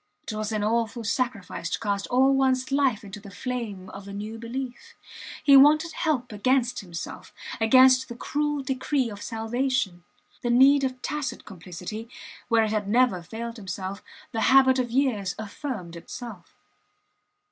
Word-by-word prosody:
It - - -6
was 215 0 -3
an 215 -1 -1
awful 230 +1 0
sacrifice 215 -7 -2
to - - -2
cast 200 -2 -2
all 265 +2 +4
ones 265 -1 +1
life 270 -5 +2
into 200 +1 -9
the 200 0 -12
flame 210 -3 -5
of 200 0 -10
a 200 - -8
new 215 +3 -6
belief. 260 - -6 0.5
He 280 -2 +7
wanted 305 +4 +6
help 260 -7 -1
against 245 +4 +1
himself, 175 -4 -8 0.3
against 255 +3 +6
the 240 - -6
cruel 295 +3 -2
decree 265 -2 -1
of 205 0 -9
salvation. 225 -5 -2 0.4
The 240 - -1
need 270 +3 +6
of 255 -1 -3
tacit 295 -3 -3
complicity, 185 +4 -8 0.4
where 230 -2 +4
it 215 - -1
had 210 -2 -1
never 235 -5 +3
failed 230 +5 -7
him, 195 - -11 0.6
the 225 - -2
habit 260 0 +5
of 245 -1 -1
years 230 -7 0
affirmed 215 - -6
itself. 195 +1 -9
235 Hz, 155 wpm, -26 LUFS, 205-260 Hz, 0.6 s, He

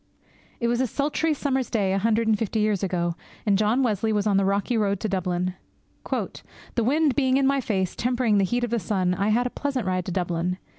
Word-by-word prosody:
It 235 - 0
was 240 +1 +1
a 260 - +1
sultry 295 +6 0
summer's 265 -3 -1
day 195 -4 +1
a 195 - +1
hundred 225 +2 +1
and 220 - +4
fifty 220 +1 -2
years 210 -2 +1
ago, 175 -3 -1 0.3
and 205 -2 +3
John 215 +6 +2
Wesley 220 -2 0
was 210 -1 0
on 205 -2 +2
the 195 - +2
rocky 200 +5 0
road 200 -3 +1
to 220 - -1
Dublin. 180 -2 -1 0.6
'The 235 - -4
wind 290 +4 +2
being 265 -1 +3
in 275 - +2
my 275 0 +2
face, 190 -7 -1
tempering 240 -4 +1
the - - +3
heat 240 +6 0
of 240 - -2
the 235 - +1
sun, 185 -1 0
I 195 +2 0
had 240 +3 +2
a 250 - -2
pleasant 275 -5 -2
ride 185 -1 -1
to - - -4
Dublin. 175 0 -1
215 Hz, 230 wpm, -25 LUFS, 190-245 Hz, 0.6 s, and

